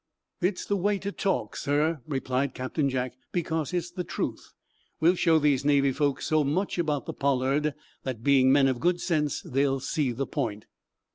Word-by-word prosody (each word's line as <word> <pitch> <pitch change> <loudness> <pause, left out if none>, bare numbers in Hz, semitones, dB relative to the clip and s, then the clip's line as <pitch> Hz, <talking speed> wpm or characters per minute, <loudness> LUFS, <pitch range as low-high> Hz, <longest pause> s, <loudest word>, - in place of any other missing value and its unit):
"It's 180 +1 0
the 205 - 0
way 200 +2 +1
to 200 +1 -4
talk, 195 -1 -1
sir," 150 +2 0
replied 135 -2 -1
Captain 140 +3 -1
Jack, 130 -1 -2 0.2
"because 160 -3 -1
it's 175 -1 -2
the 180 0 -4
truth. - - -4 0.5
We'll 165 +3 +5
show 165 -3 +3
these 145 -3 +2
Navy 140 -1 +3
folks 140 0 0
so 155 -1 +2
much 175 +7 -1
about 150 -4 0
the - - -5
'Pollard' 140 +2 +1 0.3
that, 125 -4 -5
being 130 -1 +5
men 135 0 +5
of 130 -2 0
good 175 +3 +1
sense, 150 -6 0
they'll 135 +1 +1
see 135 0 -1
the 130 +4 -2
point." 110 -9 -3
145 Hz, 180 wpm, -27 LUFS, 135-165 Hz, 0.5 s, We'll